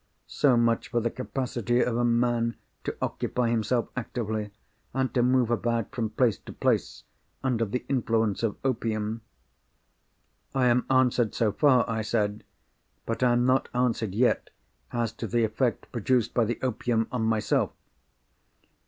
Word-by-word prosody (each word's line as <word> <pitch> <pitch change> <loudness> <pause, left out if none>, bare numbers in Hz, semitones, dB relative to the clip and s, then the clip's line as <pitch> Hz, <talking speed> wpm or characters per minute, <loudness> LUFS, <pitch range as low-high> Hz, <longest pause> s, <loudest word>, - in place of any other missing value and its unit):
So 130 -4 +3
much 115 -1 +2
for 120 - 0
the 115 0 -1
capacity 125 -2 -2
of 120 -1 +1
a 120 - +1
man 120 0 +1 0.3
to - - -3
occupy 120 -2 -1
himself 115 +1 0
actively, 110 -4 -3 0.5
and 130 -1 0
to 125 - +2
move 125 -1 +3
about 115 0 -1
from 115 -4 -1
place 115 0 +1
to - - -11
place - - 0 0.4
under 120 -3 +1
the 115 +4 -3
influence 115 -5 +1
of 115 -3 -1
opium." 110 -3 -1 1.3
"I 130 -1 +3
am 125 0 +3
answered 125 -3 +3
so 110 -3 +2
far," 125 +2 +4
I 110 -1 -1
said; 105 -1 -1 0.6
"but 115 - -3
I 125 -1 +4
am 120 +1 +2
not 130 +1 +2
answered 115 -5 0
yet 120 +3 +2 0.4
as 120 -2 -1
to 115 0 -6
the 120 +1 +1
effect 110 +2 -1
produced 120 0 +1
by 120 - +3
the 115 +1 -2
opium 115 -2 0
on 125 -3 -1
myself." 110 -1 +1
120 Hz, 155 wpm, -27 LUFS, 110-125 Hz, 1.3 s, far